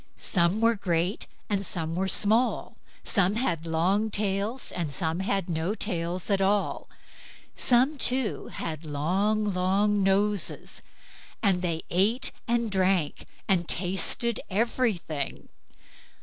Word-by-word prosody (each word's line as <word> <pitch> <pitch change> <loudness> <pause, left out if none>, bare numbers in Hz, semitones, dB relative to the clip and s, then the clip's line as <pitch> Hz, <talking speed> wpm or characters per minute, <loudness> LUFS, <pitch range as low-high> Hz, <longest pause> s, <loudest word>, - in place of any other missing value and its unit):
Some 175 +4 +1
were 230 +1 +4
great, 180 -2 -1 0.2
and 200 -1 -1
some 165 -4 -3
were 190 +3 -1
small; 220 +6 +3 0.3
some 195 -2 +2
had 170 -9 -1
long 185 +7 +1
tails, 205 +4 -1
and 170 -5 -3
some 160 +2 -1
had 195 -1 -1
no 170 +4 -1
tails 180 -2 -2
at 195 -1 +2
all; 200 +1 0 0.7
some, 260 +4 +2
too, 255 -3 +1
had 155 -1 -5
long, 185 +9 0
long 200 +3 +2
noses; 195 0 0 0.6
and 190 -4 +3
they 165 -3 -2
ate 215 +9 +2 0.2
and 235 -2 0
drank, 185 -5 +1 0.2
and 175 -4 +2
tasted 195 +5 0
everything. 200 - -1
195 Hz, 120 wpm, -27 LUFS, 175-215 Hz, 0.7 s, were